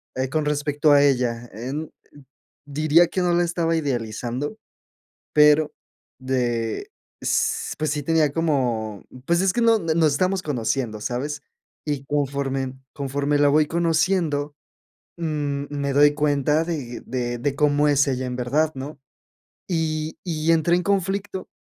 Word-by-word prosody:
eh, 130 0 -1
con 155 +1 -1
respecto 150 +1 +1
a 140 0 +6
ella, 120 -3 +1
eh, 120 +5 -5 1.0
diría 155 +4 +4
que 185 - -2
no 175 -1 +2
la 175 0 +3
estaba 170 -1 0
idealizando. 125 - -3 0.8
Pero 150 0 +5 0.5
de 120 -3 -1 0.3
s - - 0
pues, 155 -2 0
sí 150 0 -2
tenía 160 0 +2
como, 125 - -1 0.2
pues, 170 +1 +2
es 190 - +3
que 240 - +1
no, 230 -1 +5
nos 160 -3 +2
estamos 185 +4 0
conociendo, 115 -4 -2
¿sabes? 140 +6 -3 0.4
Y 145 -2 -2
conforme 135 -2 -1 0.2
conforme 140 +1 -1
la 145 0 +5
voy 150 +1 +4
conociendo, 165 -3 0 0.6
mm, 145 -3 -2
me 140 -1 -2
doy 145 +1 +6
cuenta 150 +1 +1
de 145 -8 -5
de 120 -1 -2
de 140 +3 -1
cómo 150 0 +3
es 145 0 +3
ella 130 -1 -1
en 125 - -4
verdad, 145 +6 +1
¿no? 135 +2 -7 0.7
Y 160 -2 -2
y 165 -1 0
entré 165 +1 +3
en 180 - -2
conflicto, 195 0 -1
145 Hz, 140 wpm, -23 LUFS, 130-160 Hz, 1.0 s, a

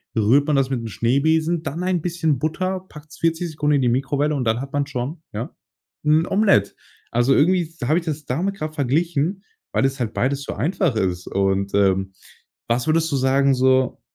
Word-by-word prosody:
rührt 120 +6 +4
man 150 - +1
das 135 -1 +2
mit 130 -3 -2
'n - - -5
Schneebesen, 155 - +1
dann 155 +2 -4
ein 185 -2 0
bisschen 160 -4 0
Butter, 185 +6 -2
packt's 150 0 -13
40 165 +1 0
Sekunden 150 -1 0
in - - 0
die 125 - +2
Mikrowelle 140 +4 0
und 135 - -1
dann 115 +1 0
hat 135 0 -7
man 145 0 0
schon, 140 +4 -5
ja, 110 +3 -5 0.5
'n 155 +2 +3
Omelett. 195 - +2 0.3
Also, 120 +3 +2
irgendwie 180 +5 +3
s 165 +1 -13
habe 155 +3 +3
ich 170 - -11
das 150 -2 -4
damit 180 +11 -1
grad 155 -4 -5
verglichen, 160 +6 0 0.3
weil - - +1
das 135 0 0
halt 115 -3 -2
beides 140 +2 -1
so - - -5
einfach 170 - 0
ist. 90 -3 -1
Und, 100 0 0
ähm, 95 -1 +2 0.5
was 120 +1 0
würdest 160 0 +2
du - - +1
sagen 135 +1 +3
so 130 0 +2
140 Hz, 200 wpm, -22 LUFS, 125-160 Hz, 0.5 s, rührt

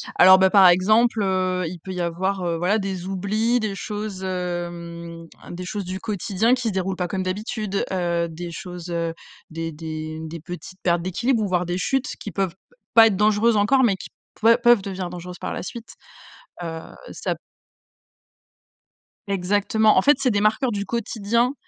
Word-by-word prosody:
Alors 185 +1 +8
bah, 190 0 +5
par 195 -3 +8
exemple, 215 +5 +4
heu, 185 -1 0
il 175 +1 -7
peut 190 +3 -8
y 180 -1 -3
avoir, 185 +3 -1
heu, 170 -1 0
voilà, 185 +6 +2
des 190 -3 -4
oublis, 215 +6 0
des 215 -3 -2
choses, 205 -2 -5
hem, 170 -2 -5 0.2
des 180 +1 -6
choses 200 0 -4
du 185 +1 -5
quotidien 215 +3 0
qui 250 -2 0
se 210 - -1
déroulent 190 0 -1
pas 180 -1 -2
comme 190 +1 -2
d'habitude, 205 +1 -2
heu, 170 -2 0
des 170 +1 -7
choses, 175 0 -8
heu, 170 -1 -2 0.4
des 165 0 -4
des 155 0 -6
des 160 +1 -7
petites 180 +3 -9
pertes 170 -1 +2
d'équilibre 225 +7 0
ou 205 - 0
voir 180 -1 0
des 175 +1 -2
chutes 270 +7 0
qui 205 - -6
peuvent 195 -3 -1
p 195 - -33 0.2
pas 225 -1 +9
être 210 - +1
dangereuses 215 +2 +3
encore, 260 +6 +4
mais 205 -6 +3
qui - - -10 0.3
peu 230 +2 +6
peuvent 240 -4 +5
devenir 190 -2 -4
dangereuses 180 0 -8
par - - -4
la - - -5
suite, 230 +3 -8 0.7
heu, 165 -1 -5 0.3
ça - - -2
p - - -20 1.9
Exactement. 205 +3 +2
En 185 - +6
fait, 290 +4 +5
c'est 255 -3 +2
des 205 0 +1
marqueurs 220 +4 +2
du 200 -2 -3
quotidien 235 +2 0
190 Hz, 185 wpm, -23 LUFS, 175-215 Hz, 1.9 s, pas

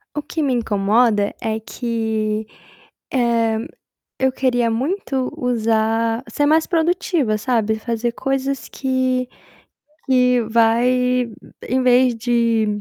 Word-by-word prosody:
O 295 - -1
que 310 +2 -3
me 270 -3 +1
incomoda 210 -1 +2
é 220 0 -1
que, 220 -2 -2 0.7
eh, 230 -3 +1 0.6
eu 265 0 +3
queria 245 -3 +1
muito 265 - -2
usar 225 -1 0
ser 290 - 0
mais 315 +1 +4
produtiva, 335 - 0
sabe, 220 -2 0
fazer 235 +1 -2
coisas 270 +2 -2
que 255 -1 -1 0.8
que 250 -2 +3
vai 245 +2 +2 0.4
em 260 +1 +1
vez 250 -1 +4
de 225 -3 +1
245 Hz, 110 wpm, -20 LUFS, 225-260 Hz, 0.8 s, mais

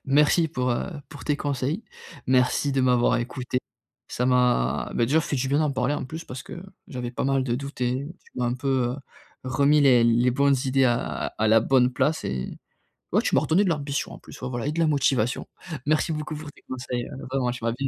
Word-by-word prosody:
merci 150 +4 +4
pour, 125 -4 -1
heu, 120 - -1 0.2
pour 145 -2 -10
tes 150 -1 +1
conseils. 145 - -2 0.4
Merci 130 +2 +2
de 135 - +2
m'avoir 125 -2 +3
écouté, 125 +1 -3 0.5
ça 125 - -1
m'a 125 - +2
beh, 115 - +2
déjà 155 +5 +3
fait 145 - -2
du 130 +1 -1
bien 140 +2 +2
d'en 150 -2 +2
parler, 135 +2 0
en - - -3
plus, 160 +6 -7
parce 130 0 -7
que 170 - -9 0.3
j'avais 125 -6 -4
pas - - -3
mal 135 -1 +2
de 120 - 0
doutes 140 +1 -6
et 130 +3 0 0.2
tu - - -22
m'as 125 -1 -1
un 120 - 0
peu, 135 +2 -4 0.2
heu, 125 - -4 0.5
remis 140 +3 +3
les 130 -4 +6
les 120 +2 +4
bonnes 140 +1 +3
idées 135 0 +3
à 120 0 -1
à 110 - +2
la 110 +1 +6
bonne 125 +1 +3
place 140 +5 0
et 65 -1 -3 0.6
ouais, - - +3
tu - - -1
m'as - - +5
redonné 180 +6 +3
de 190 - +1
l'ambition 145 -3 -2
en - - -10
plus. - - -13
Ouais, 130 - -3
voilà 120 +2 -3
et 150 - 0
de 165 - -3
la 165 - +4
motivation. 130 -5 +1 0.4
Merci 155 +2 +2
beaucoup 155 0 -4
pour 150 -1 -8
tes - - -21
conseils 125 -1 -4 0.2
vraiment, 130 -2 0
tu 120 -2 -8
m'as 115 - +1
bien 135 +3 -2
130 Hz, 230 wpm, -25 LUFS, 125-145 Hz, 0.6 s, les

